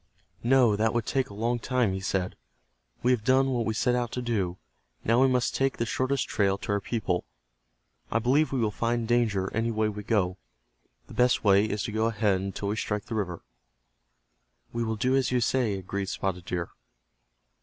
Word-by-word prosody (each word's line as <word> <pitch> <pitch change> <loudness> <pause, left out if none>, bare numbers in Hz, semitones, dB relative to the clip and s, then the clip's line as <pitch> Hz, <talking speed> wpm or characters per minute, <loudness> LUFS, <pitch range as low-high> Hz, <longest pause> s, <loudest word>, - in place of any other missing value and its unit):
"No, 120 -3 +4
that 110 +2 +1
would 120 -2 0
take 135 -2 0
a 100 - -10
long 120 +3 0
time," 125 -4 +1
he 95 - -2
said. 95 -1 -2 0.7
"We 125 - +4
have 120 -4 +1
done 135 +2 +3
what 120 -3 0
we 110 - -1
set 125 +2 +2
out 120 -2 -1
to 125 - -2
do. 100 -7 -1 0.5
Now 115 +3 +3
we 135 - +6
must 125 -1 +1
take 135 0 0
the 115 - 0
shortest 130 +3 0
trail 100 -1 +1
to 100 - -5
our 100 - +2
people. 95 -6 -1 0.9
I - - +1
believe 130 +5 +2
we 135 - 0
will 110 -3 +1
find 115 +1 -1
danger 110 -5 +1
any 115 +1 0
way 110 -1 +1
we 105 0 -6
go. 95 -4 0 0.7
The - - -13
best 125 0 +3
way 100 0 +5
is 105 -1 -2
to - - -3
go 110 +1 +1
ahead 105 -4 +1
until 100 +1 -3
we 105 - -1
strike 105 -1 -2
the - - -6
river." 90 -6 -3 1.3
"We 120 0 -1
will 110 -1 -1
do 130 +5 +1
as 135 -2 +1
you 125 - +2
say," 120 -3 +1
agreed 95 +1 -4
Spotted 90 -3 -3
Deer. 90 -2 -3
110 Hz, 200 wpm, -27 LUFS, 100-125 Hz, 1.3 s, we